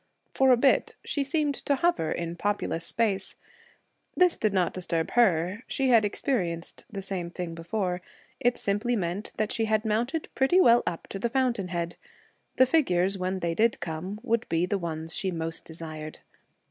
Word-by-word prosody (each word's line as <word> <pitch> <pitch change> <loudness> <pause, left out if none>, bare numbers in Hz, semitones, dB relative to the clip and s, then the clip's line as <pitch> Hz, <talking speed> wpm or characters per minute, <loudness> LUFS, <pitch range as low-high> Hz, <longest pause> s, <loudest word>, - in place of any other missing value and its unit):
For 265 0 +4
a 250 - +6
bit 265 +2 +3
she 285 - 0
seemed 295 0 0
to 280 - +4
hover 275 - +1
in 170 0 -3
populous 200 -4 -1
space. 215 -4 0 0.8
This 360 -1 +4
did 215 - +2
not 185 -3 +1
disturb 170 -3 -1
her; 190 -3 +2
she 270 -1 0
had 230 -3 +6
experienced 185 - -2
the 200 -4 -6
same 185 -3 -4
thing 175 -1 -5
before. 180 +2 -2 0.4
It 245 0 +2
simply 210 +5 0
meant 190 0 -3
that 215 -1 0
she 225 - +1
had 215 0 +1
mounted 240 +9 -1
pretty 270 +8 +3
well 240 -8 +6
up 170 - -3
to 195 - -5
the 235 - 0
fountain 245 -6 0
head. 170 -1 -3 0.6
The 260 - +6
figures, 195 - +2
when 185 +1 -2
they 170 -1 0
did 225 +6 +2
come, 175 +5 -5
would 230 0 0
be 165 +1 +2
the 195 +2 -1
ones 160 -1 -4
she 190 - -1
most 165 -2 -3
desired. 155 -1 -8
195 Hz, 175 wpm, -27 LUFS, 170-240 Hz, 0.8 s, a